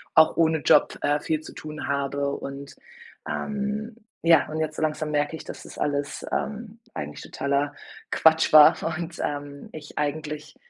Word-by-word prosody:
auch 160 Hz, 0 st, +6 dB
ohne 160 Hz, -1 st, +3 dB
Job, 150 Hz, -, +4 dB
äh, 145 Hz, +1 st, +2 dB
viel 155 Hz, +1 st, -1 dB
zu -, -, -11 dB
tun 155 Hz, -2 st, -7 dB
habe 140 Hz, 0 st, -1 dB
und, 140 Hz, 0 st, -8 dB, 0.5 s
ähm, 215 Hz, +2 st, -3 dB, 0.3 s
ja. 165 Hz, -3 st, +5 dB
Und 155 Hz, +1 st, -3 dB
jetzt 155 Hz, 0 st, -3 dB
so -, -, -3 dB
langsam 155 Hz, 0 st, -1 dB
merke 150 Hz, +1 st, 0 dB
ich, -, -, -8 dB
das -, -, -9 dB
ist -, -, -11 dB
alles, 145 Hz, -1 st, -2 dB
ähm, 220 Hz, +1 st, -4 dB, 0.2 s
eigentlich 75 Hz, 0 st, -5 dB
totaler 140 Hz, +1 st, -1 dB, 0.4 s
Quatsch 160 Hz, 0 st, +4 dB
war 150 Hz, -1 st, +9 dB, 0.2 s
und, 170 Hz, 0 st, -6 dB
ähm, 145 Hz, -1 st, -5 dB
ich 150 Hz, -1 st, -10 dB
eigentlich 150 Hz, 0 st, -3 dB
150 Hz, 165 wpm, -25 LUFS, 145-160 Hz, 0.5 s, war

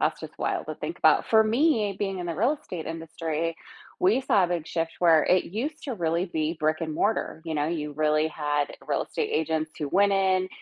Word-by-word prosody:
That's -, -, 0 dB
just -, -, -9 dB
wild -, -, -1 dB
to -, -, -4 dB
think -, -, -5 dB
about. -, -, +4 dB
For 220 Hz, -1 st, +6 dB
me, 220 Hz, -, +2 dB
being 195 Hz, -2 st, -2 dB
in 175 Hz, -, -4 dB
the 170 Hz, -, -3 dB
real 240 Hz, -, +2 dB
estate 170 Hz, -4 st, -7 dB
industry, 165 Hz, 0 st, -3 dB, 0.4 s
we 205 Hz, +8 st, +4 dB
saw 200 Hz, -7 st, +3 dB
a -, -, -1 dB
big 170 Hz, -3 st, -2 dB
shift 165 Hz, 0 st, -2 dB
where 165 Hz, -3 st, +5 dB
it 185 Hz, -, +3 dB
used 280 Hz, -, -4 dB
to 265 Hz, -, -3 dB
really 170 Hz, -1 st, 0 dB
be 160 Hz, -1 st, -2 dB
brick-and-mortar, 155 Hz, +4 st, -1 dB
you 160 Hz, -1 st, -3 dB
know, 145 Hz, -1 st, 0 dB
you 150 Hz, -2 st, -3 dB
really 155 Hz, +1 st, +2 dB
had 145 Hz, -2 st, -1 dB, 0.2 s
real -, -, 0 dB
estate -, -, -3 dB
agents 160 Hz, 0 st, 0 dB
who 150 Hz, -, -2 dB
went 200 Hz, +5 st, +3 dB
in 190 Hz, -1 st, +2 dB
170 Hz, 210 wpm, -26 LUFS, 155-200 Hz, 0.4 s, For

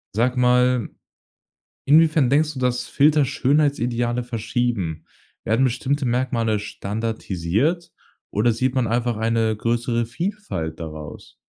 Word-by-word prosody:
Sag 125 Hz, +3 st, +1 dB
mal, 125 Hz, -1 st, +3 dB, 1.0 s
inwiefern 155 Hz, -3 st, +4 dB
denkst 150 Hz, +2 st, +2 dB
du, 135 Hz, -, -7 dB
dass 125 Hz, -1 st, 0 dB
Filter 150 Hz, 0 st, +3 dB
Schönheitsideale 125 Hz, -4 st, 0 dB
verschieben? 110 Hz, -8 st, -2 dB, 0.4 s
Werden 115 Hz, +3 st, +1 dB
bestimmte 130 Hz, +3 st, -1 dB
Merkmale 120 Hz, -3 st, 0 dB
standardisiert, 110 Hz, -, -2 dB, 0.4 s
oder 115 Hz, +4 st, +2 dB
sieht 125 Hz, +3 st, -1 dB
man 125 Hz, -4 st, +1 dB
einfach 120 Hz, 0 st, 0 dB
eine 110 Hz, -1 st, +1 dB
größere 115 Hz, +1 st, 0 dB
Vielfalt 170 Hz, -, -4 dB
daraus? 75 Hz, -2 st, -9 dB
120 Hz, 110 wpm, -22 LUFS, 110-130 Hz, 1.0 s, inwiefern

